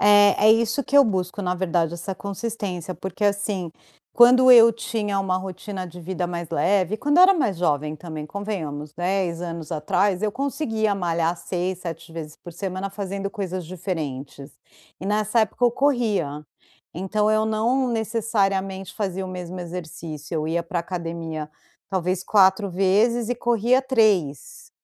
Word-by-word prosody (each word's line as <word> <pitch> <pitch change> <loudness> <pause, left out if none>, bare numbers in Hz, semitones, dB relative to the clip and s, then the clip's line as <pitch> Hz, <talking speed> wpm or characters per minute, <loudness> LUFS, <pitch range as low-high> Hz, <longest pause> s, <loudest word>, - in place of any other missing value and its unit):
É, 205 0 +6
é - - +9
isso 230 +5 +1
que 280 - 0
eu 280 - +8
busco 190 -1 -2
na 180 0 0
verdade 170 -2 0
essa 180 +3 -5
consistência, 200 -3 -5
porque 190 +3 -4
assim, 200 -4 0 0.4
quando 255 +2 +7
eu 230 -2 +9
tinha 210 -3 -2
uma 185 -1 0
rotina 190 0 -6
de 175 +1 -11
vida 180 +1 -3
mais 170 -1 -5
leve, 190 +3 +1
quando 290 +6 +1
eu - - +9
era 385 +1 +7
mais 215 - 0
jovem 150 -2 0
também, 155 -2 -7
convenhamos, 155 -7 -5
10 175 0 -1
anos 165 -2 -6
atrás. 180 +5 +1
Eu 210 - +1
conseguia 225 -6 -1
malhar 170 -2 0
6, 180 +1 -3
7 165 -1 -7
vezes 155 -2 -7
por 175 - -11
semana, 190 +2 -4
fazendo 200 0 -4
coisas 185 -4 -4
diferentes 150 -6 -5 0.5
e 190 - -5
nessa 215 +2 +1
época 220 +3 0
eu 240 - +5
corria. 220 - 0 0.5
Então, 210 +4 0
eu 215 0 +2
não 235 +4 +1
necessariamente 200 -4 -1
fazia 190 -2 -3
o - - -6
mesmo 180 0 -6
exercício, 165 -3 -7
eu 155 0 -1
ia 170 +1 0
pra 170 0 -3
academia, 165 -3 -5 0.4
talvez 185 -1 -1
4 195 0 +4
vezes 215 +6 +2
e - - +1
corria 240 +2 +2
3. 230 - 0
190 Hz, 155 wpm, -23 LUFS, 170-215 Hz, 0.5 s, é